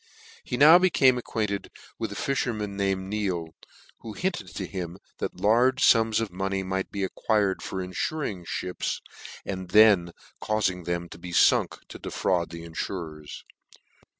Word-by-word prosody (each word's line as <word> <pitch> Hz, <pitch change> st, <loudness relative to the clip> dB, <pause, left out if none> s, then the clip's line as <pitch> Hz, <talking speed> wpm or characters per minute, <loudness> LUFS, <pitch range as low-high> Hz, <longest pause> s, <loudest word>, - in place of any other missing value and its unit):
He 125 Hz, -, -3 dB
now 155 Hz, +6 st, +9 dB
became 135 Hz, -9 st, +4 dB
acquainted 105 Hz, -4 st, -3 dB, 0.3 s
with 110 Hz, -2 st, -3 dB
a -, -, -6 dB
fifherman 110 Hz, -7 st, -2 dB
named 95 Hz, -1 st, -1 dB
Neale, 95 Hz, -6 st, -2 dB, 0.5 s
who 110 Hz, -, -8 dB
hinted 180 Hz, -, -2 dB
to 95 Hz, -, -3 dB
him 90 Hz, -1 st, -6 dB, 0.2 s
that -, -, -3 dB
large 125 Hz, +5 st, +3 dB
fums 115 Hz, -1 st, +5 dB
of 110 Hz, -4 st, -2 dB
money 95 Hz, +1 st, -2 dB
might 95 Hz, +1 st, -2 dB
be 100 Hz, -1 st, -3 dB
acquired 100 Hz, 0 st, 0 dB
for -, -, -5 dB
infuring 95 Hz, -, -3 dB, 0.2 s
mips, 90 Hz, -, -3 dB, 0.5 s
and 95 Hz, -2 st, -5 dB
then 100 Hz, -4 st, +6 dB, 0.3 s
caufing 95 Hz, -5 st, 0 dB
them 85 Hz, 0 st, -2 dB
to -, -, -11 dB
be 90 Hz, +1 st, -8 dB
funk, 85 Hz, -, +4 dB
to -, -, -9 dB
defraud 85 Hz, -3 st, -1 dB
the 85 Hz, 0 st, -8 dB
infurers. 80 Hz, -2 st, -6 dB
100 Hz, 150 wpm, -26 LUFS, 90-110 Hz, 0.5 s, now